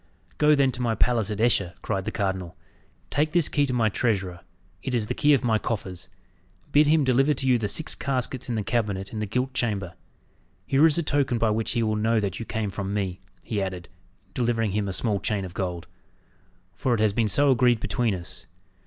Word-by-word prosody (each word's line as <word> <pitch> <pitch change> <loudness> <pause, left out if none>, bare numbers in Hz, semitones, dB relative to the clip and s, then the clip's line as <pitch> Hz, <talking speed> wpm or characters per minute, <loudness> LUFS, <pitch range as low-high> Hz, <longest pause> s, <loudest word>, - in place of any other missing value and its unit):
"Go, 150 0 +5
then, 135 -2 +3
to 125 - -6
my 115 -2 +1
palace 115 -2 +1
at 105 -1 -4
Esher," 100 -6 +2
cried 95 -3 -2
the 110 - -2
cardinal. 95 -4 -3 0.6
"Take 150 +2 +1
this 175 -4 +4
key 145 -1 +1
to 125 - -2
my 115 -3 +2
treasurer 95 -5 -1 0.4
it 130 -2 -2
is 115 -3 0
the 120 - -3
key 150 +3 +3
of 135 - -2
my 110 -3 +2
coffers. 95 -6 -4 0.6
Bid 150 +1 +5
him 155 0 +4
deliver 135 +3 +3
to 135 - -2
you 125 -2 +4
the 105 - -1
six 155 +10 0
caskets 130 -2 -2
in 120 - -1
the 110 - -1
cabinet 100 -3 -2
in 110 - -4
the 105 - -2
gilt 125 +5 -1
chamber. 100 -8 -2 0.7
Here 140 +4 +5
is 155 - +1
a 170 - +1
token 140 -4 +1
by 115 -1 +2
which 110 +1 -1
he 120 -2 +1
will 110 -1 0
know 110 +1 +2
that 100 -3 -3
you 115 - -6
came 110 -3 -2
from 100 +1 -4
me," 95 -3 -2 0.2
he 105 -3 -2
added, 95 -2 -5 0.4
delivering 115 -3 0
him 105 0 -1
a 95 - -3
small 105 0 0
chain 100 -2 -1
of 90 - -9
gold, 90 -3 -3 0.9
"for 125 -2 0
it - - -3
has 110 -2 +2
been 115 0 +1
so 140 +7 +4
agreed 125 -2 +3
between 105 +1 0
us. 90 -1 -7
110 Hz, 220 wpm, -25 LUFS, 100-125 Hz, 0.9 s, Go